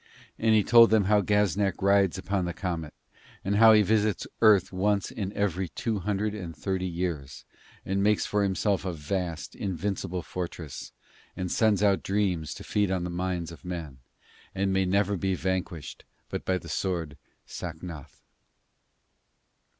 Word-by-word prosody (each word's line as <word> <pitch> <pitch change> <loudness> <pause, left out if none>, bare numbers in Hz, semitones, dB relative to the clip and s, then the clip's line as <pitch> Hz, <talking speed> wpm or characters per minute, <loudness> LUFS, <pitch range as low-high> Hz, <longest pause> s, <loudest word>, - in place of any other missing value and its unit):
And 110 -1 +4
he 105 - +4
told 115 +1 +7
them 110 -2 +4
how 105 +2 +3
Gaznak 100 -2 +1
rides 100 -2 +3
upon 95 -2 -1
the 85 - -4
comet, 85 -5 -4 0.5
and 100 +1 +1
how 110 0 +8
he 105 -1 +6
visits 105 0 +1 0.2
Earth 105 -5 +5
once 100 +1 0
in 100 -3 -4
every 95 -3 -1
two 110 +5 -2
hundred 105 +2 -1
and 90 -6 -6
thirty 95 -2 -2
years, 85 -6 -4 0.4
and 95 +1 0
makes 105 +1 +2
for 105 - 0
himself 100 0 +1
a 95 -2 -3
vast, 85 +1 -4
invincible 95 -1 -3
fortress 85 -5 -6 0.5
and 90 -1 -3
sends 110 -2 +3
out 100 -2 +3
dreams 95 -7 -1
to - - -9
feed 105 -2 0
on 95 -2 -1
the 90 - -3
minds 90 -1 -2
of 85 - -12
men, 85 -7 -6 0.6
and 95 0 0
may 95 0 +2
never 100 +1 +1
be 95 +1 0
vanquished 90 -4 -3 0.3
but - - -5
by 95 - +1
the 85 - -10
sword 85 -2 -2 0.3
Sacnoth. 80 -3 -8
95 Hz, 160 wpm, -27 LUFS, 85-105 Hz, 0.6 s, how